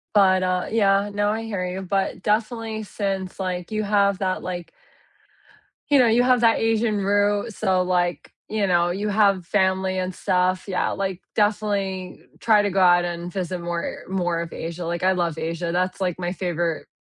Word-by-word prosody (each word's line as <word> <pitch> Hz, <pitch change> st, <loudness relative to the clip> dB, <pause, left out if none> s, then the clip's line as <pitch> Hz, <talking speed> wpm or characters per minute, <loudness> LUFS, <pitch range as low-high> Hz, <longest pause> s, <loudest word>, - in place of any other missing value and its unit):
But, 185 Hz, -2 st, +5 dB
uh 185 Hz, 0 st, 0 dB
yeah, 200 Hz, -2 st, +3 dB
no 205 Hz, 0 st, +1 dB
I 220 Hz, +2 st, -1 dB
hear 200 Hz, -5 st, -3 dB
you. 180 Hz, +1 st, -4 dB
But 195 Hz, +1 st, -2 dB
definitely, 220 Hz, 0 st, -1 dB
since, 195 Hz, -2 st, -4 dB
like, 180 Hz, -2 st, -3 dB
you 215 Hz, 0 st, -2 dB
have 200 Hz, -1 st, +2 dB
that, 185 Hz, -1 st, -1 dB
like 175 Hz, -2 st, -6 dB, 1.2 s
you 285 Hz, -1 st, +5 dB
know, 250 Hz, -, +5 dB
you 230 Hz, +2 st, +4 dB
have 250 Hz, -1 st, +3 dB
that 230 Hz, -1 st, +4 dB
Asian 225 Hz, -1 st, +1 dB
root 205 Hz, +2 st, +1 dB
so, 190 Hz, -3 st, +1 dB
like, 180 Hz, -1 st, -1 dB, 0.2 s
you 215 Hz, -2 st, 0 dB
know, 175 Hz, -1 st, +3 dB
you 200 Hz, +4 st, -2 dB
have 200 Hz, -3 st, +3 dB
family 190 Hz, 0 st, +1 dB
and 185 Hz, 0 st, -3 dB
stuff. 185 Hz, +1 st, 0 dB
Yeah, 185 Hz, -2 st, 0 dB
like, 190 Hz, -2 st, -3 dB
definitely 200 Hz, -3 st, -1 dB, 0.2 s
try 215 Hz, -2 st, +4 dB
to 205 Hz, -, 0 dB
go 195 Hz, -, +1 dB
out 175 Hz, -1 st, +5 dB
and 175 Hz, 0 st, -5 dB
visit 180 Hz, -1 st, -3 dB
more 170 Hz, 0 st, -3 dB
more 175 Hz, -3 st, -1 dB
of 170 Hz, -, -6 dB
Asia, 170 Hz, +1 st, -5 dB
like, 170 Hz, +1 st, -3 dB
I 190 Hz, -, +4 dB
love 170 Hz, -3 st, -1 dB
Asia, 165 Hz, +1 st, -3 dB
that's, 185 Hz, +2 st, -1 dB
like, 180 Hz, -3 st, -1 dB
my 175 Hz, -1 st, -2 dB
favorite, 175 Hz, -3 st, -2 dB
190 Hz, 185 wpm, -23 LUFS, 180-205 Hz, 1.2 s, But